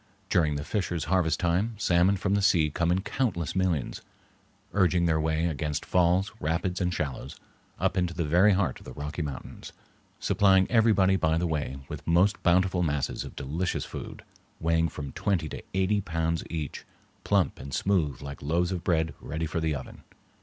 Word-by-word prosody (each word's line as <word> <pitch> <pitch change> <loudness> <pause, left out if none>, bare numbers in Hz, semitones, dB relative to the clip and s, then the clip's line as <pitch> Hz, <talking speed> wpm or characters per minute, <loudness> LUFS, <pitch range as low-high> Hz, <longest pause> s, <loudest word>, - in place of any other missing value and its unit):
During 75 -4 +3
the 70 - -3
fisher's 90 -3 -2
harvest 80 -3 +1
time 95 +6 0
salmon 95 0 +3
from 100 +1 0
the 100 - +2
sea 85 -6 +3
come 85 +3 +1
in 90 +2 +1
countless 100 - -2
millions, 90 -8 0 0.7
urging 90 -3 +3
their 80 -2 +2
way 80 +1 0
against 75 -2 -2
falls, 90 +2 +2
rapids, 85 +4 -1
and 90 0 +1
shallows, 70 -2 -4 0.4
up - - +1
into 90 -2 0
the 85 - -1
very 90 +7 +5
heart 90 -8 0
of - - -16
the 65 - -8
Rocky 75 +4 -5
Mountains, 70 -4 -7 0.5
supplying 95 -2 +4
everybody 105 -5 +4
by 80 -2 +1
the 90 - 0
way 75 -5 -2
with - - -8
most 90 +5 +3
bountiful 90 +1 +3
masses 75 -5 -1
of - - -10
delicious 80 +7 -2
food, - - -8 0.4
weighing 85 0 +2
from 70 -3 -7
twenty 85 -2 -1
to - - -7
eighty 95 +2 +2
pounds 80 -2 -1
each, 80 -4 -4 0.4
plump - - +1
and 70 - -8
smooth 80 -10 0
like 70 0 -7
loaves 85 +5 0
of 90 -2 -3
bread 80 -2 +1
ready 80 +2 -3
for 80 +1 -2
the 80 -2 0
oven. 65 - -8
85 Hz, 175 wpm, -27 LUFS, 80-95 Hz, 0.7 s, very